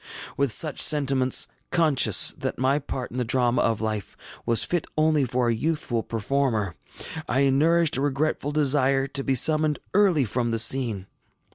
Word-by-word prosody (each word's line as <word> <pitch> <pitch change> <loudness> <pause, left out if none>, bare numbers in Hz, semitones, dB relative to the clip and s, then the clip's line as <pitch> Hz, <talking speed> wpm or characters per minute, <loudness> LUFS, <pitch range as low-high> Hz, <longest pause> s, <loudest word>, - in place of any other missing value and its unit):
With 140 -3 0
such 150 +6 -1
sentiments, 135 -4 +3 0.2
conscious 155 -6 +3
that - - -5
my 135 +3 +1
part 130 -3 -6
in 125 - -7
the 125 - 0
drama 125 +1 0
of 115 -2 -1
life 110 -2 -5 0.3
was 115 -1 +1
fit 175 -3 -2
only 155 -2 +2
for 125 0 -1
a 120 - +1
youthful 120 -2 -2
performer, 115 -4 -2 0.6
I 135 +2 +2
nourished 160 +2 +2
a - - -2
regretful 145 +1 -2
desire 135 -2 +2
to 140 0 -1
be 135 - 0
summoned 155 +3 +2 0.2
early 185 -9 +3
from 120 +2 -2
the 115 - -1
scene. 115 -4 +2
135 Hz, 160 wpm, -24 LUFS, 120-150 Hz, 0.6 s, sentiments